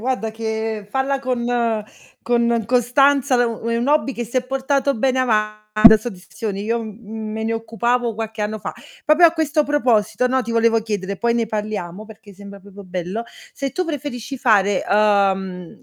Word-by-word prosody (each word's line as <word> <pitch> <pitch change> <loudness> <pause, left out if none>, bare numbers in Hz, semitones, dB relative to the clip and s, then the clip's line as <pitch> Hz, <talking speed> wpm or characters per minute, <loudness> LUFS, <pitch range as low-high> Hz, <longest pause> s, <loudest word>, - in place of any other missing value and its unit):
Guarda 240 -2 -2
che 220 -1 -4
falla 270 +4 0
con 255 -2 -2 0.8
con 235 -2 +1
costanza 255 +2 +3
è - - +4
u 230 -1 -3
è 230 - 0
un 235 +2 -1
hobby 295 -2 +2
che 240 - -3
se 245 +3 -1
portato 270 +1 0
bene 260 +2 +1
ava 215 -4 0 0.2
dà 220 -1 +11
soddisfazioni, 210 -1 -6
io, 230 +1 -1
mhmm, 220 0 -7
me 220 - -3
ne 225 - -1
occupavo 230 +1 -1
qualche 220 0 -5
anno 210 +1 -2
fa. 210 - -5 0.3
Proprio 310 +3 +6
a 325 - +3
questo 310 -2 +1
proposito, 250 -5 +1
no, 260 +1 +1
ti 235 - -6
volevo 230 0 +3
chiedere, 200 -3 -4
poi 235 0 +1
ne 235 - +1
parliamo 210 -2 -5
perché 210 -2 -14
sembra 200 +1 -11
proprio 200 +1 -13
bello, 185 +4 -4 0.3
se 275 -2 -4
tu 365 +6 -1
preferisci 270 -5 -5
fare 205 -5 +3
uhm, 195 -4 +1
225 Hz, 175 wpm, -20 LUFS, 210-255 Hz, 0.8 s, dà